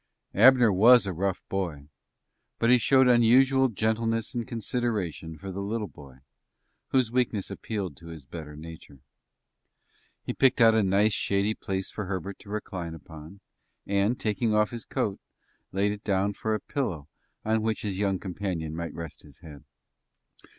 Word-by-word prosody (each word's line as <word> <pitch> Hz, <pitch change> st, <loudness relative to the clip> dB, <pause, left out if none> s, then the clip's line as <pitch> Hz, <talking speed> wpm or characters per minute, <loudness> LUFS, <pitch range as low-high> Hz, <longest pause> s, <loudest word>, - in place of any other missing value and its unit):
Abner 120 Hz, 0 st, +6 dB
was 115 Hz, +4 st, +7 dB
a 95 Hz, -, -3 dB
rough 95 Hz, +2 st, -2 dB
boy, 80 Hz, -7 st, -4 dB, 0.7 s
but 115 Hz, +1 st, +3 dB
he 125 Hz, -, +6 dB
showed 130 Hz, +2 st, +4 dB
unusual 130 Hz, +3 st, +5 dB
gentleness 115 Hz, 0 st, -1 dB
and 120 Hz, -3 st, -3 dB
consideration 110 Hz, -9 st, -3 dB
for 95 Hz, +3 st, -7 dB
the 95 Hz, +2 st, -5 dB
little 105 Hz, +2 st, -2 dB
boy, 70 Hz, -4 st, -15 dB, 0.7 s
whose 130 Hz, -4 st, +1 dB
weakness 120 Hz, -5 st, 0 dB
appealed 100 Hz, -8 st, -4 dB
to 85 Hz, -, -13 dB
his 80 Hz, -4 st, -10 dB
better 75 Hz, 0 st, -9 dB
nature. 75 Hz, -3 st, -11 dB, 1.2 s
He -, -, -3 dB
picked 130 Hz, -1 st, +3 dB
out 115 Hz, -1 st, +7 dB
a 110 Hz, -, +3 dB
nice, 100 Hz, +2 st, +3 dB
shady 100 Hz, +3 st, 0 dB
place 95 Hz, -3 st, -4 dB
for 105 Hz, -, -5 dB
Herbert 95 Hz, +1 st, -5 dB
to 100 Hz, -, -15 dB
recline 95 Hz, -5 st, -5 dB
upon, 80 Hz, +5 st, -12 dB, 0.4 s
and, 100 Hz, +4 st, +1 dB
taking 110 Hz, +1 st, 0 dB
off 105 Hz, 0 st, +2 dB
his 120 Hz, -2 st, -7 dB
coat, 100 Hz, -2 st, -2 dB, 0.5 s
laid 100 Hz, +2 st, +1 dB
it 105 Hz, +1 st, -7 dB
down 100 Hz, 0 st, +1 dB
for 110 Hz, +2 st, -2 dB
a -, -, -2 dB
pillow 90 Hz, -, -3 dB, 0.4 s
on 110 Hz, 0 st, +1 dB
which 110 Hz, 0 st, -2 dB
his 100 Hz, -3 st, -3 dB
young 100 Hz, -2 st, +1 dB
companion 90 Hz, -4 st, -4 dB
might 85 Hz, 0 st, -5 dB
rest 85 Hz, -3 st, -8 dB
his 70 Hz, -3 st, -16 dB
head. 75 Hz, -5 st, -12 dB
100 Hz, 160 wpm, -27 LUFS, 85-115 Hz, 1.2 s, was